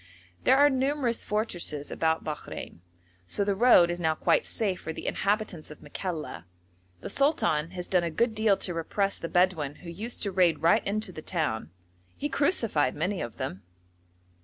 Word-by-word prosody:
There 265 Hz, -, +6 dB
are 290 Hz, +1 st, +7 dB
numerous 265 Hz, -2 st, 0 dB
fortresses 175 Hz, -9 st, -2 dB
about 160 Hz, 0 st, 0 dB
Bakhrein, 150 Hz, -, -6 dB, 0.5 s
so 200 Hz, -, 0 dB
the 200 Hz, 0 st, +1 dB
road 195 Hz, -5 st, +6 dB
is 175 Hz, -, -4 dB
now 160 Hz, -2 st, +1 dB
quite -, -, +2 dB
safe 195 Hz, -5 st, -1 dB
for 160 Hz, -, -4 dB
the -, -, -7 dB
inhabitants 205 Hz, -5 st, -1 dB
of 150 Hz, -, -11 dB
Makalla; 150 Hz, -, -5 dB, 0.6 s
the -, -, -6 dB
sultan 275 Hz, -, +1 dB
has 180 Hz, -, -4 dB
done 180 Hz, -2 st, +2 dB
a 170 Hz, -, -1 dB
good 230 Hz, +8 st, +1 dB
deal 215 Hz, -2 st, +3 dB
to 180 Hz, -, -2 dB
repress 195 Hz, +4 st, -1 dB
the 165 Hz, -, -5 dB
Bedouin 175 Hz, -6 st, +2 dB
who 170 Hz, -, -6 dB
used 220 Hz, +8 st, -3 dB
to 200 Hz, -, -1 dB
raid 175 Hz, -5 st, +2 dB
right 165 Hz, -, +5 dB
into 215 Hz, 0 st, -2 dB
the 155 Hz, -, -8 dB
town. 155 Hz, -, -2 dB, 0.5 s
He 290 Hz, -, -2 dB
crucified 230 Hz, -, +1 dB
many 180 Hz, +5 st, -1 dB
of 115 Hz, -6 st, -6 dB
them. 95 Hz, -, -4 dB
180 Hz, 175 wpm, -28 LUFS, 160-215 Hz, 0.6 s, are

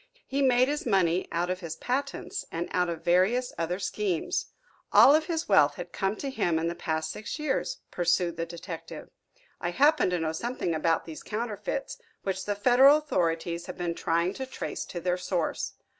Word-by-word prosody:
"He 275 Hz, +1 st, -1 dB
made 255 Hz, -1 st, +4 dB
his 295 Hz, -2 st, -2 dB
money 185 Hz, -4 st, +2 dB
out 175 Hz, +2 st, 0 dB
of 185 Hz, -, -3 dB
his 165 Hz, -3 st, -5 dB
patents 275 Hz, +8 st, -3 dB
and 170 Hz, +1 st, -3 dB
out 180 Hz, -1 st, +1 dB
of 165 Hz, -1 st, -5 dB
various 190 Hz, +9 st, +2 dB
other 170 Hz, +2 st, -1 dB
schemes." 190 Hz, -3 st, -1 dB, 0.4 s
"All 280 Hz, -, +8 dB
of 310 Hz, +1 st, +3 dB
his 325 Hz, -2 st, -2 dB
wealth 145 Hz, -8 st, +5 dB
has -, -, -5 dB
come 195 Hz, +2 st, -1 dB
to 275 Hz, +4 st, -4 dB
him 175 Hz, -10 st, +1 dB
in 165 Hz, +1 st, 0 dB
the 170 Hz, -, -1 dB
past 160 Hz, -1 st, -2 dB
six 215 Hz, -, -6 dB
years," 305 Hz, -, -1 dB
pursued 175 Hz, 0 st, +1 dB
the 165 Hz, 0 st, -3 dB
detective. 170 Hz, 0 st, -8 dB, 0.5 s
"I -, -, -2 dB
happen 295 Hz, -4 st, +4 dB
to 180 Hz, -, 0 dB
know 160 Hz, -1 st, -1 dB
something 205 Hz, 0 st, -2 dB
about 165 Hz, +1 st, +1 dB
these 160 Hz, -2 st, -8 dB
counterfeits, 220 Hz, -, -4 dB, 0.2 s
which 190 Hz, -1 st, -2 dB
the 205 Hz, -, -1 dB
federal 255 Hz, +7 st, +6 dB
authorities 170 Hz, -, -1 dB
have 180 Hz, -, -7 dB
been 175 Hz, -1 st, -2 dB
trying 170 Hz, +2 st, 0 dB
to 265 Hz, +4 st, -5 dB
trace -, -, -5 dB
to 175 Hz, -, -6 dB
their 180 Hz, +1 st, 0 dB
source. 180 Hz, -2 st, -2 dB
185 Hz, 190 wpm, -28 LUFS, 170-250 Hz, 0.5 s, All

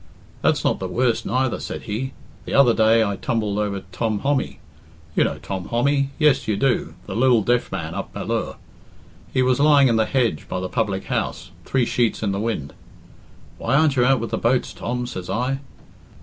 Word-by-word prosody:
"That's -, -, +2 dB
not -, -, +1 dB
the 95 Hz, -, -3 dB
worst 120 Hz, +5 st, 0 dB
neither," 130 Hz, -1 st, 0 dB
said -, -, -6 dB
he. 125 Hz, +5 st, -4 dB, 0.3 s
"The -, -, -3 dB
other 130 Hz, -4 st, +6 dB
day 110 Hz, 0 st, +4 dB
I 100 Hz, -2 st, -2 dB
tumbled 105 Hz, -1 st, -1 dB
over 100 Hz, -2 st, -2 dB
Tom 110 Hz, +2 st, -1 dB
Hommy 140 Hz, -1 st, 0 dB, 0.6 s
you -, -, +4 dB
know -, -, -1 dB
Tom 95 Hz, -2 st, -5 dB
Hommy, 140 Hz, +3 st, +1 dB
yes, 150 Hz, -4 st, +3 dB
you 105 Hz, -2 st, 0 dB
do, 135 Hz, 0 st, 0 dB
the 95 Hz, -, -6 dB
lil 120 Hz, -2 st, +4 dB
deaf 120 Hz, +3 st, +1 dB
man 85 Hz, -4 st, -4 dB
up -, -, -5 dB
Ballure. -, -, -3 dB, 0.8 s
He 130 Hz, -, +2 dB
was 125 Hz, 0 st, +2 dB
lying 145 Hz, -2 st, +6 dB
in 115 Hz, -, +2 dB
the 110 Hz, -, +3 dB
hedge 120 Hz, -, 0 dB
by 90 Hz, -, -2 dB
the 90 Hz, 0 st, -4 dB
public 105 Hz, -5 st, -1 dB
house, -, -, -3 dB
three 130 Hz, -3 st, +1 dB
sheets 115 Hz, -1 st, 0 dB
in 100 Hz, -, +1 dB
the 100 Hz, -, -2 dB
wind. 105 Hz, -11 st, -3 dB, 0.9 s
'Why -, -, 0 dB
aren't 150 Hz, -1 st, +4 dB
you 125 Hz, -, +3 dB
out 135 Hz, 0 st, +4 dB
with 115 Hz, -, -4 dB
the -, -, -1 dB
boats, 125 Hz, +2 st, +1 dB
Tom?' 125 Hz, +1 st, -3 dB
says 95 Hz, -7 st, -6 dB
I. 130 Hz, +3 st, -1 dB
120 Hz, 195 wpm, -22 LUFS, 105-130 Hz, 0.9 s, other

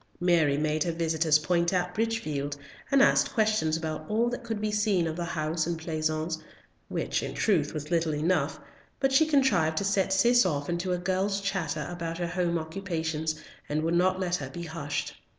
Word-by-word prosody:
Mary 165 Hz, -5 st, +3 dB
made 155 Hz, 0 st, +1 dB
her 170 Hz, -, -1 dB
visitors 160 Hz, -2 st, +2 dB
point 170 Hz, +3 st, +1 dB
out 180 Hz, -1 st, 0 dB
Bridgefield, 155 Hz, -11 st, -2 dB, 0.3 s
and 275 Hz, 0 st, +6 dB
asked -, -, +3 dB
questions 215 Hz, -8 st, +2 dB
about 155 Hz, -1 st, -4 dB
all 225 Hz, +3 st, +2 dB
that 245 Hz, 0 st, -5 dB
could 225 Hz, -2 st, -3 dB
be 215 Hz, 0 st, -1 dB
seen 210 Hz, -4 st, +2 dB
of 160 Hz, -1 st, -2 dB
the 175 Hz, 0 st, -3 dB
house 160 Hz, 0 st, -1 dB
and 170 Hz, -1 st, -1 dB
pleasance, 155 Hz, 0 st, -2 dB, 0.5 s
which, -, -, -1 dB
in -, -, -5 dB
truth, 165 Hz, -9 st, +2 dB
was 150 Hz, +2 st, -5 dB
little 165 Hz, -2 st, +1 dB
enough, 155 Hz, -1 st, 0 dB, 0.4 s
but 270 Hz, 0 st, +2 dB
she 310 Hz, +3 st, +5 dB
contrived 205 Hz, -, +3 dB
to -, -, +1 dB
set 195 Hz, -1 st, +1 dB
Cis 240 Hz, +6 st, +5 dB
off 145 Hz, -5 st, -1 dB
into 175 Hz, +2 st, -1 dB
a 180 Hz, -, +1 dB
girl's 190 Hz, +3 st, 0 dB
chatter 175 Hz, -7 st, -2 dB
about 165 Hz, -1 st, -4 dB
her 175 Hz, -1 st, -2 dB
home 175 Hz, -1 st, 0 dB
occupations, 160 Hz, -2 st, -3 dB, 0.3 s
and 150 Hz, +1 st, 0 dB
would 165 Hz, +1 st, 0 dB
not 185 Hz, +2 st, +2 dB
let 180 Hz, -1 st, 0 dB
her 135 Hz, -4 st, -6 dB
be 170 Hz, +5 st, -7 dB
hushed. 145 Hz, -3 st, -4 dB
170 Hz, 190 wpm, -28 LUFS, 155-195 Hz, 0.5 s, and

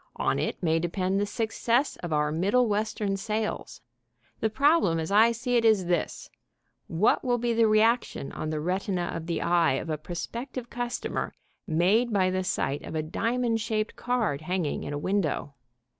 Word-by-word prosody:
On -, -, 0 dB
it -, -, -3 dB
may 165 Hz, -1 st, +2 dB
depend 185 Hz, +3 st, -1 dB
the 205 Hz, -, 0 dB
success 230 Hz, +4 st, 0 dB
of 175 Hz, -, -6 dB
our 150 Hz, 0 st, +1 dB
Middle 200 Hz, +10 st, +2 dB
Western 210 Hz, -1 st, -1 dB
sales. 215 Hz, +1 st, -3 dB, 0.6 s
The 220 Hz, -, +1 dB
problem 275 Hz, -, +3 dB
as 160 Hz, +3 st, -3 dB
I 220 Hz, +3 st, +6 dB
see 240 Hz, +2 st, 0 dB
it 230 Hz, -, +2 dB
is 215 Hz, -5 st, +4 dB
this: 175 Hz, -2 st, -1 dB, 0.6 s
what 170 Hz, +7 st, +2 dB
will 245 Hz, -2 st, +1 dB
be 240 Hz, 0 st, 0 dB
the 230 Hz, -1 st, +4 dB
reaction 215 Hz, -, +2 dB
on 155 Hz, -, -4 dB
the 155 Hz, -1 st, -2 dB
retina 180 Hz, +1 st, -1 dB
of 165 Hz, 0 st, -5 dB
the 170 Hz, -, -1 dB
eye 170 Hz, -3 st, +3 dB
of 155 Hz, +5 st, -3 dB
a 155 Hz, -, -2 dB
prospective 235 Hz, -, -6 dB
customer 245 Hz, 0 st, -3 dB, 0.3 s
made 195 Hz, +9 st, +2 dB
by 190 Hz, -3 st, +2 dB
the 185 Hz, 0 st, -1 dB
sight 145 Hz, -5 st, -1 dB
of -, -, -7 dB
a 155 Hz, -, 0 dB
diamond 230 Hz, +7 st, 0 dB
shaped 215 Hz, -1 st, -2 dB
card 230 Hz, -, -1 dB
hanging 175 Hz, -2 st, -2 dB
in -, -, -5 dB
a -, -, -2 dB
window? 160 Hz, -4 st, -1 dB
200 Hz, 175 wpm, -27 LUFS, 170-230 Hz, 0.6 s, I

